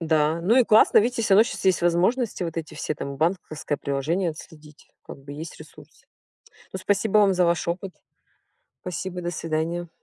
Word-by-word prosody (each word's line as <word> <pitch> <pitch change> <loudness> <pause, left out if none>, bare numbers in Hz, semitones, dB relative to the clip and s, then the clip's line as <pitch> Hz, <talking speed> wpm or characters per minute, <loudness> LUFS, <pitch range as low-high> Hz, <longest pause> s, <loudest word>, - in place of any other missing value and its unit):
Да, 160 0 +1
ну 200 +8 +2
и 255 - +6
классно, 220 -1 +5
видите 230 +1 +1
всё 200 -3 +3
равно 215 - +7
сейчас - - -6
есть 190 -2 +2
возможности 185 +7 +1
вот 165 -2 -4
эти 160 -2 -5
все 155 - -3
там 140 -1 -6
банковское 155 -2 -2
приложение 155 +6 -1
отследить, 155 -1 -14 0.2
как - - -10
бы 140 +1 -11
есть 155 +3 -8
ресурсы. - - -16 0.7
Ну 190 - -4
спасибо 205 +2 +2
вам 200 -2 +4
за 180 -1 +2
ваш 170 -1 0
опыт. 180 +2 -4 0.9
Спасибо, 180 0 -5
до 175 - -2
свидания. 165 +1 -3
175 Hz, 180 wpm, -24 LUFS, 155-195 Hz, 0.9 s, равно